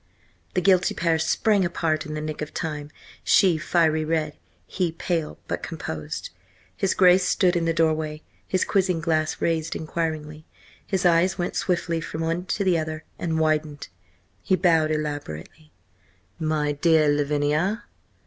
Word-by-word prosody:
The 185 - +2
guilty 185 -1 +3
pair 165 -2 +1
sprang 200 +5 +2
apart 160 -3 -1
in 155 - -5
the 150 - -3
nick 155 0 -5
of 150 - -6
time, 150 -3 -4 0.3
she 180 -5 +4
fiery 160 -1 +2
red, 155 -1 -1 0.3
he 175 - -1
pale, 165 -2 -2
but - - -3
composed. 80 - -5 0.4
His 195 -2 0
Grace 185 0 +6
stood 180 -1 +2
in 170 -1 +1
the 165 - +2
doorway, 155 -2 0 0.2
his 185 - +1
quizzing 185 -3 +1
glass 155 -1 0
raised 165 -1 0
inquiringly. 155 -1 -4 0.4
His 190 -2 -1
eyes 175 +2 +3
went 175 -1 -2
swiftly 175 -2 0
from 160 0 -5
one 165 +2 -1
to 200 - -1
the 180 -3 +3
other 155 0 -4 0.2
and 160 -2 -1
widened. 155 - 0 0.5
He 190 - +2
bowed 165 -4 +3
elaborately. 150 - -5 0.7
"My 155 -2 0
dear 155 +1 +3
Lavinia! 150 +8 +1
160 Hz, 150 wpm, -24 LUFS, 155-175 Hz, 0.7 s, Grace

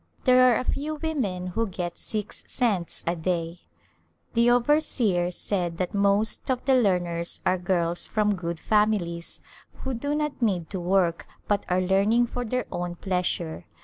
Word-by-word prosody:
There 255 -1 +6
are 235 - +3
a - - -2
few 295 +4 -2
women 260 - -2
who 225 +3 0
get 175 -2 -4
six 210 -1 -5
cents 205 -9 -1
a 170 - 0
day. 170 0 -2 0.7
The 235 +1 +4
overseer 240 - +2
said 175 -2 -2
that 180 0 -2
most 200 +4 +2
of 255 -1 -1
the 270 - +4
learners 175 -8 +1
are 185 - +2
girls 175 -1 0
from 210 -1 +1
good 170 -3 -4
families 205 -6 0 0.4
who 265 - -2
do 285 +5 -2
not 300 -3 -2
need 185 -8 0
to 190 - -2
work 175 -1 +1 0.2
but 205 -1 0
are 180 +1 +2
learning 200 +6 +3
for 245 +1 -4
their 250 +2 -2
own 175 0 -3
pleasure. 180 -3 -2
195 Hz, 160 wpm, -26 LUFS, 175-240 Hz, 0.7 s, There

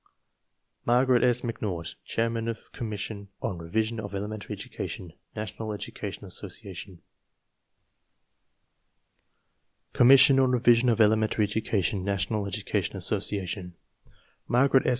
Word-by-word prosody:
Margaret 125 +1 +3
S. 125 -1 +3
McNaught 100 -8 -4
Chairman 115 0 -1
of 115 -1 -6
Commission 105 -3 -5
on 90 - -3
Revision 110 +7 -1
of 100 -2 -6
Elementary 105 +1 -5
Education, 85 -3 -6 0.2
National 110 0 -5
Education 100 0 -6
Association 95 0 -6
V 85 - -21 2.9
vu - - -15
COMMISSION 135 +2 +8
ON 130 -1 +4
REVISION 120 0 +4
OF 115 - +2
ELEMENTARY 110 0 +3
EDUCATION, 100 -3 -1
NATIONAL 100 +1 -1
EDUCATION 100 - -2
ASSOCIATION 95 -2 -1 0.7
Margaret 135 +2 +4
S. - - +5
110 Hz, 110 wpm, -27 LUFS, 100-115 Hz, 2.9 s, COMMISSION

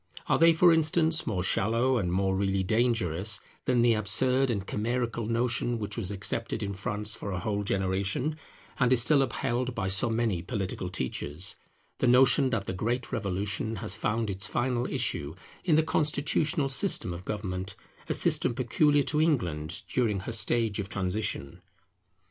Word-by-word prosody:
Are - - +1
they, 165 0 +7
for 170 +1 +5
instance, 160 0 +2
more 95 -6 -1
shallow 115 +7 +2
and 90 -4 -2
more 95 +1 +1
really 95 0 0
dangerous 110 -3 +2 0.3
than 125 -2 +2
the 120 -1 +4
absurd 125 +5 +1
and 100 -5 -2
chimerical 115 +1 -2
notion 120 +1 0
which 105 -2 -4
was 100 -5 -1
accepted 105 +3 -1
in 100 0 -3
France 105 +2 -2
for 100 - -5
a 95 - -3
whole 100 +3 -2
generation, 95 +9 -1 0.4
and 125 -1 +3
is 130 - +7
still 140 +3 +4
upheld 125 -1 -2
by 95 -3 -2
so 100 +6 +1
many 110 -6 0
political 95 -2 -4
teachers; 75 +2 -3 0.4
the 130 - +2
notion 130 +2 +5
that 115 -6 -2
the 95 - -4
great 120 +6 -2
Revolution 100 -1 -2
has 105 +1 -4
found 110 -1 -1
its 100 +2 -2
final 125 -1 -1
issue 75 +3 -1 0.3
in 170 -4 +3
the 160 - +4
constitutional 150 0 0
system 135 - 0
of 85 +1 -8
government, 95 -2 -4 0.3
a - - +1
system 120 - +1
peculiar 145 +4 +2
to 150 +2 0
England 90 - -1
during 110 -6 0
her 105 - -5
stage 110 -1 +1
of 100 -1 -4
transition? 90 -5 -3
110 Hz, 165 wpm, -28 LUFS, 95-125 Hz, 0.4 s, they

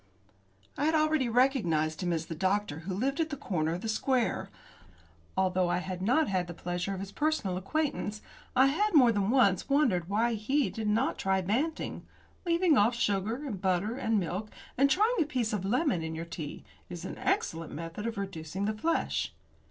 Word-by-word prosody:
I 290 - +1
had 320 +1 +3
already 310 -5 +2
recognised 180 - +2
him 175 -1 0
as 165 -1 -1
the 165 - -5
doctor 190 -2 0
who 180 +4 -5
lived 270 - -1
at 320 -1 +1
the 285 - -4
corner 160 -9 -1
of 180 - -6
the - - -4
square. 245 +2 0 0.9
Although 185 -1 +2
I - - +1
had 180 0 -4
not 255 +11 +3 0.2
the 175 - -7
pleasure 175 +3 -3
of - - -6
his 195 0 -6
personal 295 -10 0
acquaintance, 215 - -2 0.4
I 260 - +6
had 365 +8 +1
more 250 -5 +7
than 205 -2 0
once 230 -7 +3
wondered 230 - +2
why 230 +4 +2
he 265 +7 0
did 220 -2 -4
not 225 +6 +1
try 190 0 +1
Banting. 255 - -2 0.4
Leaving 335 -3 +4
off 225 +4 +3
sugar, 225 +3 -1
and 205 -9 -5
butter, 190 +4 +1
and 225 -5 +1
milk, 190 +4 -3 0.3
and 275 +2 +4
trying 435 - +3
a - - +6
piece 250 -7 -1
of 195 -3 -2
lemon 245 - +1
in 160 0 -4
your 165 +1 -4
tea, 165 -3 -7 0.3
is 175 0 -7
an - - -6
excellent 165 -1 -1
method 165 +8 -5
of 230 -2 -4
reducing 190 -1 -4
the 215 - 0
flesh. 325 +10 -1
210 Hz, 190 wpm, -30 LUFS, 180-270 Hz, 0.9 s, more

